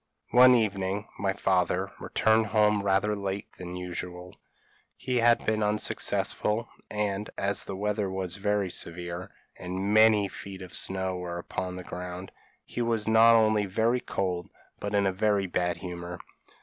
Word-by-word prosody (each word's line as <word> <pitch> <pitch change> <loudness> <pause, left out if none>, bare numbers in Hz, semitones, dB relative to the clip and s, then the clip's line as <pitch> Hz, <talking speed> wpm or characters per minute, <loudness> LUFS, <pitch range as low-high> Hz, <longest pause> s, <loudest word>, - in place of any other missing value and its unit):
p> 120 - -1
"One 125 0 +9
evening 100 -2 -1
my 100 -1 0
father 95 0 0
returned 110 0 +2
home 105 -1 +3
rather 100 +1 +1
later 100 0 -3
than 90 -1 -6
usual; 90 0 -6 0.6
he 125 -1 -2
had 120 0 +4
been 110 0 +1
unsuccessful, 105 +1 +1 0.2
and, 105 -1 -2
as 100 0 0
the - - -5
weather 105 0 -1
was 95 -1 -2
very 100 -2 0
severe, 85 +1 -4 0.3
and 95 +3 -2
many 110 -2 +5
feet 95 0 -9
of 90 - -11
snow 95 -1 -1
were 90 -1 -5
upon 90 +1 -4
the 90 - -7
ground, 90 +1 -7 0.3
he 120 - -4
was 115 -2 0
not 115 +1 +7
only 110 -2 +3
very 115 +6 +1
cold, 90 -6 -3 0.3
but 100 0 -3
in 100 -1 +3
a 95 - +1
very 100 0 +1
bad 90 -1 -1
humour. 90 -1 -6
100 Hz, 155 wpm, -28 LUFS, 90-105 Hz, 0.6 s, One